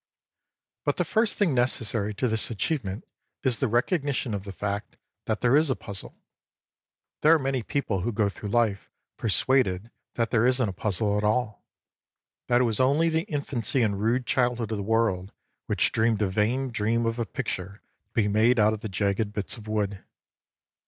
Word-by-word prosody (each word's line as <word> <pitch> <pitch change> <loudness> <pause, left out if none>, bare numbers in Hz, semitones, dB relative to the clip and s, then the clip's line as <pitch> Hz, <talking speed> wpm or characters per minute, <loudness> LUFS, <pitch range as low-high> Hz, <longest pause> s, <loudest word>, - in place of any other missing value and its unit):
But - - 0
the - - +1
first 220 0 +2
thing 190 -8 +2
necessary 115 -4 0
to 125 - 0
this 110 -2 +1
achievement 110 -3 -2 0.4
is 125 -3 +2
the 135 - +1
recognition 135 - 0
of 100 -1 -4
the 100 - -6
fact 100 0 -4 0.3
that 110 -1 -2
there 125 +2 +4
is 155 0 +4
a 130 - +1
puzzle. 100 -2 -6 1.0
There 160 +2 +6
are - - +4
many 135 -3 -1
people 110 -5 -2
who 120 - -1
go 105 -1 +1
through 100 +1 -6
life 110 -3 +1 0.3
persuaded 115 -2 +1 0.2
that 115 -2 0
there 115 - +3
isnt 125 -3 +3
a - - -5
puzzle 105 +2 0
at - - -3
all; 105 0 0 0.8
that 120 0 +3
it - - +4
was 115 -3 +1
only 145 +6 +3
the 160 +4 -1
infancy 135 -4 -1
and 100 -3 0
rude 120 +3 +1
childhood 120 -3 0
of 110 - -1
the - - -3
world 105 -3 0 0.3
which - - +2
dreamed 110 -1 +1
a - - +2
vain 120 +7 0
dream 115 +1 0
of 115 +1 -1
a 115 - 0
picture 100 -6 -4 0.3
to - - -48
be 110 -3 +2
made 110 +4 +3
out 105 0 +4
of 110 - -6
the 110 - -5
jagged 100 +2 -1
bits 105 -2 -3
of 110 -3 -12
wood. 105 -2 -2
115 Hz, 185 wpm, -26 LUFS, 105-125 Hz, 1.0 s, There